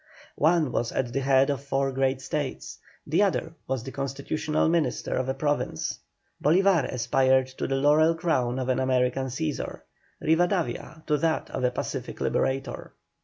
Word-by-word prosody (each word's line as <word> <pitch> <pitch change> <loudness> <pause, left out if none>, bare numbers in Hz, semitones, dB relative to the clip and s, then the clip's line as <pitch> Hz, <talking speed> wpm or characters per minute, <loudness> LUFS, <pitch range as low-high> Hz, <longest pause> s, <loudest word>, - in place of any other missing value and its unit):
One 160 -3 +3
was 120 -1 -1
at 125 -2 -2
the 135 - +1
head 135 +1 +3
of 140 -1 -4
four 135 -1 0
great 135 0 0
States, - - -4 0.3
the 160 +6 +2
other 180 -5 0
was 130 -3 -2
the 135 - -7
constitutional 140 +3 -1
minister 160 -6 0
of 130 0 -1
a 130 - -1
province. 145 +1 -1 0.4
Bolívar 180 +1 +3
aspired 130 +1 +3
to - - -1
the 135 - 0
laurel 150 +4 +4
crown 130 -8 0
of 130 -1 -2
an 130 - +2
American 130 0 +1
Cæsar, 145 +3 -3 0.4
Rivadavia 165 -2 0
to 150 -1 +1
that 160 +1 0
of 130 - -3
a 125 - +4
pacific - - -5
liberator. 135 0 -1
135 Hz, 160 wpm, -26 LUFS, 130-160 Hz, 0.4 s, laurel